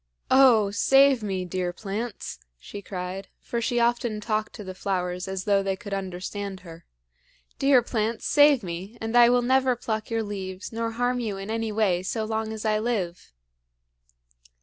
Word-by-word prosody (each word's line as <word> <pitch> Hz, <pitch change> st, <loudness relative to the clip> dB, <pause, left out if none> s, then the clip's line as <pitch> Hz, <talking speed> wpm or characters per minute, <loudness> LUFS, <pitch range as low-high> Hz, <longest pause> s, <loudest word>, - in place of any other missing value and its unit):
"Oh, 245 Hz, -6 st, +6 dB
save 270 Hz, +3 st, +5 dB
me, 190 Hz, -3 st, -2 dB
dear 180 Hz, 0 st, -2 dB
plants!" 210 Hz, +5 st, -5 dB, 0.2 s
she 200 Hz, -, -9 dB
cried, 185 Hz, 0 st, -6 dB
for 235 Hz, -, -4 dB
she 240 Hz, +1 st, 0 dB
often 235 Hz, -2 st, +1 dB
talked 215 Hz, 0 st, -2 dB
to 210 Hz, -, -8 dB
the 185 Hz, -1 st, -7 dB
flowers 180 Hz, -1 st, -2 dB
as 190 Hz, 0 st, -4 dB
though 200 Hz, 0 st, +3 dB
they 195 Hz, -1 st, -1 dB
could 200 Hz, 0 st, -8 dB
understand 195 Hz, +1 st, -5 dB
her. 165 Hz, -2 st, -12 dB, 0.7 s
"Dear 270 Hz, -3 st, +5 dB
plants, 225 Hz, -1 st, -2 dB
save 290 Hz, -4 st, +5 dB
me; 185 Hz, +6 st, -6 dB
and 225 Hz, +1 st, -3 dB
I 240 Hz, -1 st, +8 dB
will 245 Hz, 0 st, +3 dB
never 260 Hz, 0 st, +3 dB
pluck 220 Hz, -2 st, -4 dB
your 225 Hz, -1 st, 0 dB
leaves 190 Hz, -2 st, -6 dB
nor 230 Hz, 0 st, -2 dB
harm 245 Hz, +1 st, 0 dB
you 215 Hz, -5 st, -3 dB
in 195 Hz, +2 st, -6 dB
any 225 Hz, -1 st, -2 dB
way 205 Hz, -5 st, +1 dB
so 220 Hz, +4 st, -2 dB
long 220 Hz, 0 st, -2 dB
as 220 Hz, 0 st, -6 dB
I 215 Hz, 0 st, +2 dB
live." 195 Hz, -, -3 dB
215 Hz, 170 wpm, -26 LUFS, 190-235 Hz, 0.7 s, I